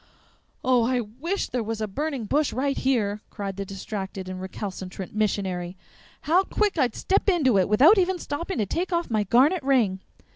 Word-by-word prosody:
"Oh, 255 -2 +4
I 250 +2 +1
WISH 265 - -3
there 245 - -1
was 225 0 -3
a 215 - -1
burning 275 +2 -3
bush 290 +7 +1
right 275 +3 0
here!" 215 -6 0
cried 200 -2 -5
the 200 - -3
distracted 195 -1 -6
and 185 0 -6
recalcitrant 190 -1 -6
missionary. 190 -4 -1 0.4
"How 350 +5 +3
quick 415 0 0
I'd 255 -8 +1
step 395 +2 +1
into 270 - +3
it 185 - +1
without 295 - +6
even 370 0 +1
stopping 335 +2 -4
to 215 - +1
take 350 - -2
off 340 -6 -1
my 215 -2 +1
garnet 275 - +4
ring!" 245 -9 +2
235 Hz, 180 wpm, -25 LUFS, 200-300 Hz, 0.4 s, without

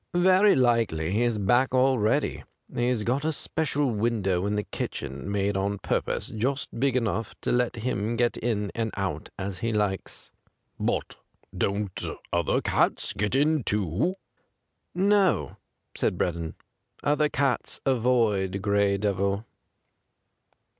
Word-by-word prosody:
'Very 185 +3 +5
likely 115 -11 +2
he's 115 +2 +1
back 120 +6 +2
already. 125 -4 +2 0.3
He's 120 -2 0
got 130 +6 0
a 160 - +1
special 145 -3 0
window 105 -4 0
in 105 - 0
the 105 - 0
kitchen, 70 +2 -5
made 100 0 0
on 100 +1 0
purpose, 95 - -2
just 125 +3 -2
big 135 0 +2
enough 115 -3 -1
to - - -1
let 125 -1 +1
him 115 -1 -2
get 120 0 +1
in 105 -4 -1
and 115 -1 -1
out 95 -6 -3
as 95 -1 -4
he 115 - -1
likes.' 105 -3 -2 0.2
' - - -46
But - - -3 0.4
don't 100 -1 -1 0.3
other 85 -2 +1
cats - - +1
get 105 +4 -1
in, 150 0 +3
too 105 - 0 0.3
?' - - -51
' - - -48
No,' 190 - +2 0.4
said - - 0
Breddon. 85 -2 -2 0.3
' - - -32
Other 150 +1 +2
cats 135 -3 0
avoid 115 -7 +2
Gray 100 0 +2
Devil.' 100 +1 0
110 Hz, 140 wpm, -26 LUFS, 100-130 Hz, 0.4 s, Very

